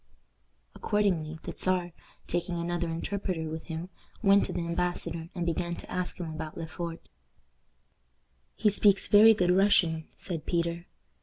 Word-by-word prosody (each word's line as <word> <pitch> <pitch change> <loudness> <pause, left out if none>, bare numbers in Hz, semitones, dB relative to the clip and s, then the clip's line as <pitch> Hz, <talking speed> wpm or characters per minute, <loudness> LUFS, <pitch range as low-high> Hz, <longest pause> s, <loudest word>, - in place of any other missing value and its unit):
Accordingly, 180 -7 0
the - - -5
Czar, 180 -2 +2 0.3
taking 175 0 -2
another 170 0 -2
interpreter 170 0 -3
with 160 0 -6
him, 165 +2 -5 0.3
went 200 0 +6
to - - -5
the 175 -2 -3
embassador 170 -1 -2
and 175 -2 -2
began 170 +1 -1
to - - -10
ask 180 0 -2
him 175 - -4
about 155 0 -6
Le 165 - -4
Fort. 165 0 -6 1.5
"He 210 - +3
speaks 200 -1 +3
very 220 +2 +8
good 180 -3 +2
Russian," 180 -4 +3
said 165 -5 -5
Peter. 170 0 -1
175 Hz, 145 wpm, -29 LUFS, 165-185 Hz, 1.5 s, very